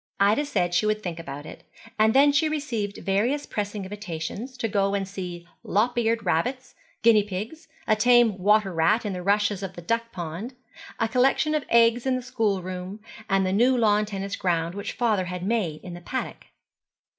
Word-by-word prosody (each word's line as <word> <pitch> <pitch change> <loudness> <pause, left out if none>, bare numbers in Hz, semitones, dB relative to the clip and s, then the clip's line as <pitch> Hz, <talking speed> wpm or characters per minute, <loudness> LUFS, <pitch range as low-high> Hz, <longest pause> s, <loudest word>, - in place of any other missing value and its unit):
Ida 210 +9 +3
said 180 -11 0
she 215 +4 +2
would 215 0 0
think 170 -2 -4
about 145 -2 -7
it: - - -11 0.4
and 220 +2 +4
then 285 +2 +6
she 290 +2 +2
received 240 -10 -3
various 235 +10 +1
pressing 205 -1 -4
invitations 205 +5 -6
to 235 - -1
go 200 -1 +1
and 195 -1 -2
see 180 -3 -7 0.2
lop 225 +5 +1
eared 230 -1 0
rabbits, 255 0 -1 0.3
guinea 225 -2 +6
pigs, 210 - -6 0.2
a 215 - +3
tame 240 -2 +4
water 205 0 +3
rat 170 +8 +2
in 205 - -2
the 180 - -5
rushes 205 +1 +1
of 190 -1 -6
the 175 - -8
duck 230 +4 -1
pond, 175 +9 -6 0.4
a 225 - +2
collection 265 +6 +2
of 305 -2 -1
eggs 235 +2 +4
in 260 - +2
the 255 - -3
schoolroom, 195 -5 -2 0.3
and 195 -1 +2
the 185 - 0
new 250 +5 +4
lawn 210 -2 +3
tennis 200 -1 -4
ground 170 -2 -1
which 200 +1 -5
father 215 -6 +1
had 180 0 -5
made 195 -8 -1
in 180 - -8
the 175 - -9
paddock. 260 +9 -5
210 Hz, 190 wpm, -25 LUFS, 185-235 Hz, 0.4 s, then